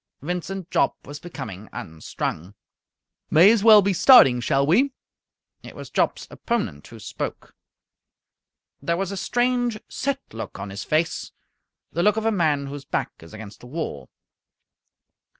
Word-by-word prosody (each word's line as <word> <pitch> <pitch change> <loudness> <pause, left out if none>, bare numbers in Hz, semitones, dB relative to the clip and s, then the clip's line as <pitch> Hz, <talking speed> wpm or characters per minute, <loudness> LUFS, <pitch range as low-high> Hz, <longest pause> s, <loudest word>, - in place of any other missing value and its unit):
Vincent 180 +2 -5
Jopp - - +2
was 145 +1 -8
becoming 110 - -8
unstrung. 80 +3 -6 0.7
"May 175 +7 +7
as 225 -3 +1
well 215 -2 +8
be 200 0 +1
starting, 160 - +7
shall 135 +3 +1
we?" 255 - +3 0.7
It - - -12
was - - -10
Jopp's - - 0
opponent 210 - -3
who 115 - -12
spoke. 105 -1 -7 1.3
There 170 0 -1
was 195 0 -2
a - - -4
strange, 245 +2 0
set 280 +1 -2
look 110 - -7
on 100 0 -7
his 100 - -6
face 160 +2 -1 0.6
the 170 - -1
look 210 +3 +3
of 220 - -2
a 225 - +3
man 155 -8 +1
whose 140 0 -7
back - - -3
is 80 - -14
against 110 -1 -10
the 125 - -13
wall. 125 - -5
160 Hz, 150 wpm, -23 LUFS, -, 1.3 s, well